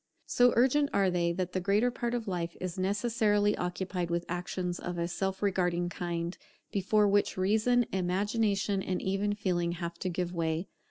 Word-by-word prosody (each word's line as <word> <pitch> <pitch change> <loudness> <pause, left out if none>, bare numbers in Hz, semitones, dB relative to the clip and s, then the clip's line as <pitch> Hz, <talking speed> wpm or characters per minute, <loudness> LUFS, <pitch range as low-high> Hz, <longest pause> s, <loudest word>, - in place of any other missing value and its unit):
So 245 0 +4
urgent 275 +4 +4
are 195 -2 +3
they, 170 -1 +1
that 180 0 -3
the 185 - 0
greater 205 +6 +2
part 240 0 -2
of 230 -2 -3
life 175 -3 -3
is 185 0 -4
necessarily 205 +1 +2
occupied 180 0 -3
with 170 0 -1
actions 180 0 -3
of 175 0 -4
a 170 0 0
self 190 +3 -3
regarding 180 -3 +1
kind, 175 0 -3 0.4
before 205 +2 +3
which 200 0 +2
Reason, 220 +6 +3
Imagination, 200 +2 0
and 185 -1 -2
even 195 +2 0
Feeling, 175 -4 0
have 170 -1 -5
to 185 - -2
give 180 0 -2
way. 165 0 -1
190 Hz, 170 wpm, -30 LUFS, 175-205 Hz, 0.4 s, So